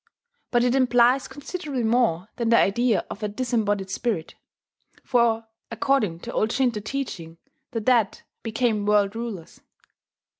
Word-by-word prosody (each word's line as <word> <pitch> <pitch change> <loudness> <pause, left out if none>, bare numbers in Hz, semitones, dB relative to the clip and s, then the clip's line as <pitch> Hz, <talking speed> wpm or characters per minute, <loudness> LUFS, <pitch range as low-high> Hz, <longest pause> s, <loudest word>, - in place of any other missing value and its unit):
But 240 -1 +2
it 250 0 +2
implies 250 0 +4
considerably 290 -3 -5
more 220 -6 +2
than 235 -2 0
the 230 - +6
idea 230 +3 +2
of - - -7
a 210 - -1
disembodied 205 -4 -1
spirit; 200 -6 -2 0.7
for, 230 -2 +2 0.2
according 230 -8 0
to - - -7
old 215 - +1
Shinto 245 -4 +1
teaching 200 -9 -5 0.3
the 225 - -3
dead 230 -3 +2 0.2
became 225 -2 0
world 205 0 +3
rulers. 225 -8 -7
230 Hz, 135 wpm, -24 LUFS, 205-250 Hz, 0.7 s, the